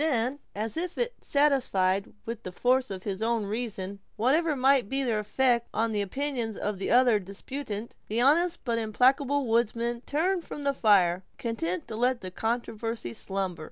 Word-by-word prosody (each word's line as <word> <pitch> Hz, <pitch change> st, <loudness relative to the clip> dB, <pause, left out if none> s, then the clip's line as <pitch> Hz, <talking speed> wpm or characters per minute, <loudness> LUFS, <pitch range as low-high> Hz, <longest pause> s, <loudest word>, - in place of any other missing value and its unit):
Then, 265 Hz, -2 st, +1 dB, 0.2 s
as 215 Hz, +4 st, -3 dB
if 355 Hz, +1 st, -3 dB, 0.2 s
satisfied 230 Hz, -10 st, +2 dB
with 230 Hz, -1 st, -5 dB
the 185 Hz, -, -6 dB
force 255 Hz, +7 st, +2 dB
of 190 Hz, -2 st, -6 dB
his 195 Hz, -1 st, -4 dB
own 225 Hz, -1 st, +1 dB
reasons, 200 Hz, -3 st, -4 dB, 0.2 s
whatever 295 Hz, +8 st, +2 dB
might 265 Hz, -4 st, +3 dB
be 270 Hz, 0 st, 0 dB
their 230 Hz, -4 st, +1 dB
effect 235 Hz, +3 st, +1 dB
on 225 Hz, +1 st, +1 dB
the 210 Hz, -1 st, 0 dB
opinions 235 Hz, +1 st, -2 dB
of 205 Hz, -2 st, -3 dB
the 195 Hz, -, -2 dB
other 245 Hz, -3 st, +5 dB
disputant, 210 Hz, +3 st, -6 dB
the 220 Hz, +3 st, -1 dB
honest 335 Hz, +7 st, +3 dB
but 235 Hz, -2 st, 0 dB
implacable 265 Hz, +5 st, +2 dB
woodsman 235 Hz, +1 st, 0 dB
turned 345 Hz, +4 st, +1 dB
from 295 Hz, -, -7 dB
the 280 Hz, 0 st, +1 dB
fire, 190 Hz, -7 st, +3 dB
content 185 Hz, -7 st, -2 dB
to 220 Hz, -, -6 dB
let 245 Hz, +2 st, +1 dB
the 185 Hz, -, -6 dB
controversy 225 Hz, -, -3 dB
slumber. 190 Hz, +2 st, -3 dB
230 Hz, 165 wpm, -28 LUFS, 205-265 Hz, 0.2 s, other